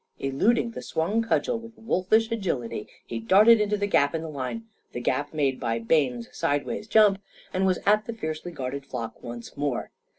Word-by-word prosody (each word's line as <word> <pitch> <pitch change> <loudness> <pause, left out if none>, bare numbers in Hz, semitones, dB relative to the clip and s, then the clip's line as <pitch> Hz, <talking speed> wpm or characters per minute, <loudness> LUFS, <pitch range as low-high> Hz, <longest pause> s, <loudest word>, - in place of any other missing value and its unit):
Eluding 225 - +1
the - - -7
swung 195 +8 0
cudgel 170 0 0
with 230 0 -12
wolfish 220 +1 +1
agility, 145 - -2 0.2
he 115 - -4
darted 210 - +6
into 210 0 +1
the 205 - 0
gap 145 -7 +2
in 160 - -2
the 160 - -5
line 150 - -5 0.3
the - - -3
gap 145 +4 -1
made 140 -4 0
by 115 -2 -1
Bayne's 125 -1 +1
sideways 145 +8 -1
jump 210 -3 +5 0.3
and 190 +1 +2
was 185 - +2
at 210 +1 +4
the 230 - -4
fiercely 160 -4 -5
guarded 135 -2 -4
flock 120 -4 -6
once 120 0 -8
more. 145 -3 -2
160 Hz, 185 wpm, -26 LUFS, 135-215 Hz, 0.3 s, darted